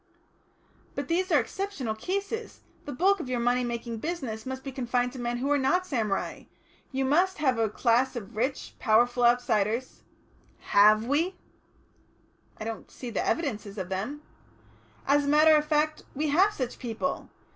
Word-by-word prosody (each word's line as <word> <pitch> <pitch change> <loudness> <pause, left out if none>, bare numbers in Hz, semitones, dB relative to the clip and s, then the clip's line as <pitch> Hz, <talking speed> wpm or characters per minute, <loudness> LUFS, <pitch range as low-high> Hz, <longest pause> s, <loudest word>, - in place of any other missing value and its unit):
"But - - -4
these 365 +3 0
are 300 - +6
exceptional 285 - -3
cases. 400 - -4 0.2
The 290 - -5
bulk 385 +9 +2
of 270 - -5
your 250 -1 -1
money 245 +1 +2
making 235 -1 -4
business 260 -8 -4
must 260 0 -5
be 270 - -5
confined 245 -1 -1
to 260 - -8
men 240 0 -2
who 270 +4 -1
are 290 - +3
not 360 +8 +2
samurai. 220 - -2 0.5
You 270 0 0
must 355 +8 +2
have 260 -6 +1
a 225 -1 +2
class 245 +4 +2
of 210 -5 -7
rich, 255 +5 -2
powerful 240 +2 +3
outsiders 235 0 +1 0.3
" - - -33 0.2
"Have 215 +2 +6
we?" 320 +8 +1 1.2
"I - - -4
don't 225 0 -6
see 245 -2 -8
the - - -1
evidences 215 -10 -2
of 185 -2 -4
them." 220 +11 -4 0.8
"As 285 +1 +3
a - - 0
matter 310 +1 +6
of 300 0 +2
fact, 305 0 +1
we 300 +2 0
have 370 +8 +4
such 255 - -4
people! 240 +3 -3
260 Hz, 170 wpm, -28 LUFS, 235-305 Hz, 1.2 s, are